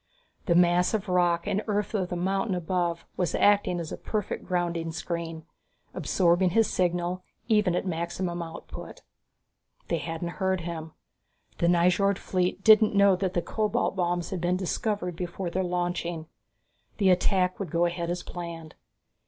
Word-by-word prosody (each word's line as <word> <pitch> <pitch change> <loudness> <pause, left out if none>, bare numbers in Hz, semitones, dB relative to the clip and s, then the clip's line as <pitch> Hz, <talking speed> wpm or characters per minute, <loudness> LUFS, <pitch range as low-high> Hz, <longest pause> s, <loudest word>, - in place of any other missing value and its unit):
The 170 - +3
mass 180 +3 +4
of 210 -1 -3
rock 175 -2 +2
and 205 - 0
earth 210 0 -1
of 190 -4 -1
the 180 - -3
mountain 195 +3 0
above 175 -1 -1
was 180 - 0
acting 205 -3 +3
as 165 -2 -5
a - - -4
perfect 210 -3 -3
grounding 170 -2 -1
screen, 165 -1 -5 0.5
absorbing 180 0 +2
his 225 +4 +3
signal 175 0 0 0.3
even 210 -6 +3
at 180 - -1
maximum 175 0 -3
output. 165 -1 -9 0.9
They 170 - +1
hadn't 165 +1 -4
heard 190 -1 +1
him. 165 -2 -6 0.7
The 170 - +2
Nyjord 180 +3 +3
fleet 185 0 -1
didn't 215 -1 +6
know 200 -1 +6
that 185 0 -2
the 175 - +1
cobalt 215 -3 0
bombs 175 -2 -1
had 185 -3 -3
been 175 +1 +1
discovered 185 -1 -2
before 175 +1 -4
their 190 +2 0
launching. 175 -2 -2 0.7
The 195 -3 +4
attack 185 0 +2
would 195 -4 -4
go 170 +3 +2
ahead 170 0 -2
as 175 0 -3
planned. 170 -2 -7
180 Hz, 155 wpm, -27 LUFS, 170-190 Hz, 0.9 s, didn't